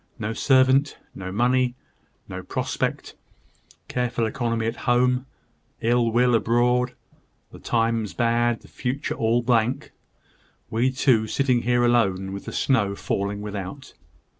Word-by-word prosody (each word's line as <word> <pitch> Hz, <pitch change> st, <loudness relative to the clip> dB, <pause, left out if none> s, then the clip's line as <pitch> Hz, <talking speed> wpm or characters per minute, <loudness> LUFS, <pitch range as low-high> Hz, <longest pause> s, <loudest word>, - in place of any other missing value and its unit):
No 110 Hz, -1 st, -3 dB
servant, 130 Hz, +2 st, +3 dB, 0.2 s
no 95 Hz, -1 st, -7 dB
money, 125 Hz, +3 st, +1 dB, 0.5 s
no -, -, -6 dB
prospect! -, -, -3 dB, 0.7 s
Careful 125 Hz, -1 st, -1 dB
economy 115 Hz, -1 st, -1 dB
at 115 Hz, +1 st, -2 dB
home, 125 Hz, +1 st, +2 dB, 0.5 s
ill 120 Hz, 0 st, +2 dB
will 125 Hz, +1 st, +3 dB
abroad; 120 Hz, +3 st, +2 dB, 0.6 s
the -, -, -12 dB
times 115 Hz, -3 st, 0 dB
bad, 120 Hz, 0 st, +1 dB
the -, -, -16 dB
future 130 Hz, +3 st, -3 dB
all 115 Hz, +2 st, +1 dB
blank 120 Hz, +1 st, +1 dB, 0.8 s
we 120 Hz, +4 st, +2 dB
two 125 Hz, -4 st, +2 dB
sitting 125 Hz, 0 st, +1 dB
here 120 Hz, 0 st, +2 dB
alone, 95 Hz, -6 st, +1 dB
with 100 Hz, -, -7 dB
the -, -, -6 dB
snow 105 Hz, -7 st, +1 dB
falling 100 Hz, +1 st, -3 dB
without!" 105 Hz, +6 st, -7 dB
120 Hz, 125 wpm, -24 LUFS, 110-125 Hz, 0.8 s, servant